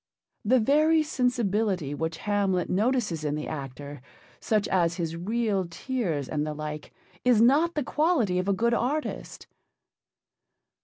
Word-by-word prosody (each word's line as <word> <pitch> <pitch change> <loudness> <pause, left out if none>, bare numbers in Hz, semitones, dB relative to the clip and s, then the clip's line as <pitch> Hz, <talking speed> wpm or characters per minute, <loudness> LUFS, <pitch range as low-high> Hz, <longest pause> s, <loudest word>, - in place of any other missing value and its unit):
The 250 +4 +4
very 310 +6 +3
sensibility 215 - 0
which 160 +2 -3
Hamlet 200 -4 0
notices 210 - 0
in 150 -1 -1
the 150 - -4
actor, 140 -1 -7 0.4
such 215 -2 0
as 170 -3 +2
his 165 -2 -3
real 200 +1 -1
tears 170 - -3
and 150 -1 -2
the 150 0 -4
like, 150 0 -6 0.3
is 245 -3 +4
not 290 +9 +4
the 300 - 0
quality 280 - +1
of 185 - -2
a 200 - +3
good 235 +4 +1
artist. 275 +6 -3
200 Hz, 140 wpm, -27 LUFS, 160-250 Hz, 0.4 s, The